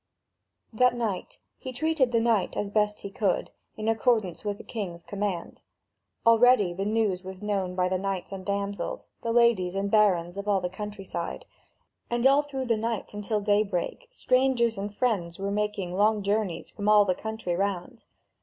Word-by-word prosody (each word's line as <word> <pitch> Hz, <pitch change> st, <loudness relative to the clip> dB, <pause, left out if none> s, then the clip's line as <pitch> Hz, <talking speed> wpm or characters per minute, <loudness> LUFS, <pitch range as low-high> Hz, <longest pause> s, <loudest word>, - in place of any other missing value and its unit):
That 250 Hz, +2 st, +4 dB
night 235 Hz, -, -3 dB, 0.2 s
he 260 Hz, -, -6 dB
treated 280 Hz, -1 st, +1 dB
the 230 Hz, -, +3 dB
knight 225 Hz, -4 st, +1 dB
as 200 Hz, -1 st, -2 dB
best 210 Hz, 0 st, +1 dB
he 200 Hz, -, -7 dB
could, 195 Hz, -2 st, 0 dB, 0.3 s
in 215 Hz, 0 st, -3 dB
accordance 220 Hz, -5 st, +1 dB
with 205 Hz, -1 st, -2 dB
the -, -, -11 dB
king's 185 Hz, -7 st, -5 dB
command. 200 Hz, -4 st, -4 dB, 0.6 s
Already 230 Hz, -5 st, +5 dB
the 195 Hz, +3 st, -3 dB
news 210 Hz, -4 st, 0 dB
was 190 Hz, +1 st, -9 dB
known 195 Hz, -3 st, -1 dB
by 180 Hz, 0 st, +2 dB
the 185 Hz, 0 st, 0 dB
knights 195 Hz, -1 st, -3 dB
and 195 Hz, -1 st, -6 dB
damsels, 200 Hz, -2 st, -3 dB
the 230 Hz, -, -2 dB
ladies 230 Hz, -6 st, +3 dB
and 200 Hz, +1 st, -1 dB
barons 190 Hz, -4 st, +3 dB
of 200 Hz, +1 st, -5 dB
all 200 Hz, -2 st, +3 dB
the 180 Hz, -1 st, -3 dB
country 205 Hz, +1 st, -7 dB
side, 170 Hz, -2 st, -5 dB, 0.6 s
and 240 Hz, +1 st, 0 dB
all 275 Hz, +2 st, +6 dB
through 275 Hz, -3 st, -5 dB
the 230 Hz, -2 st, +1 dB
night 225 Hz, -2 st, -3 dB
until 210 Hz, +1 st, -2 dB
daybreak 205 Hz, -, 0 dB
strangers 255 Hz, -, +2 dB
and 200 Hz, +1 st, -4 dB
friends 190 Hz, -9 st, 0 dB
were 195 Hz, +1 st, -3 dB
making 210 Hz, -3 st, -2 dB
long 210 Hz, +2 st, +2 dB
journeys 200 Hz, -4 st, -1 dB
from 205 Hz, 0 st, -2 dB
all 210 Hz, -1 st, +7 dB
the 185 Hz, -, +2 dB
country 220 Hz, -3 st, -4 dB
round. 190 Hz, -1 st, -3 dB
205 Hz, 175 wpm, -27 LUFS, 190-230 Hz, 0.6 s, all